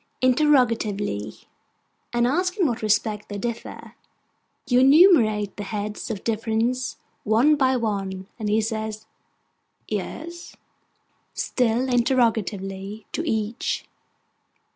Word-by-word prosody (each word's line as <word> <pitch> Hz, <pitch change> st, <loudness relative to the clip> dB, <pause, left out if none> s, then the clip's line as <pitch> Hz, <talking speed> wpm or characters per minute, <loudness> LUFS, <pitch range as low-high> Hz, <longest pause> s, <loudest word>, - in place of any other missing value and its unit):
(interrogatively), 230 Hz, -, +1 dB, 0.7 s
and 240 Hz, 0 st, +2 dB
asks 360 Hz, -, 0 dB
in 375 Hz, -, +2 dB
what 245 Hz, -4 st, -1 dB
respect 210 Hz, 0 st, 0 dB
they 205 Hz, -, -5 dB
differ. 235 Hz, +2 st, -6 dB, 0.7 s
You 245 Hz, -1 st, +3 dB
enumerate 260 Hz, -, +5 dB
the 205 Hz, -, -4 dB
heads 205 Hz, +1 st, -4 dB
of 205 Hz, -4 st, -5 dB
difference, 230 Hz, +3 st, -1 dB, 0.3 s
one 235 Hz, +8 st, +4 dB
by 265 Hz, -2 st, +2 dB
one, 195 Hz, -4 st, -3 dB
and 215 Hz, -2 st, -2 dB
he 215 Hz, +1 st, +3 dB
says 220 Hz, 0 st, -4 dB, 0.8 s
'Yes?' 340 Hz, +2 st, -6 dB, 0.8 s
(still 245 Hz, +1 st, 0 dB
interrogatively) 220 Hz, -5 st, 0 dB
to -, -, -2 dB
each. 220 Hz, +2 st, -2 dB
225 Hz, 100 wpm, -24 LUFS, 210-255 Hz, 0.8 s, enumerate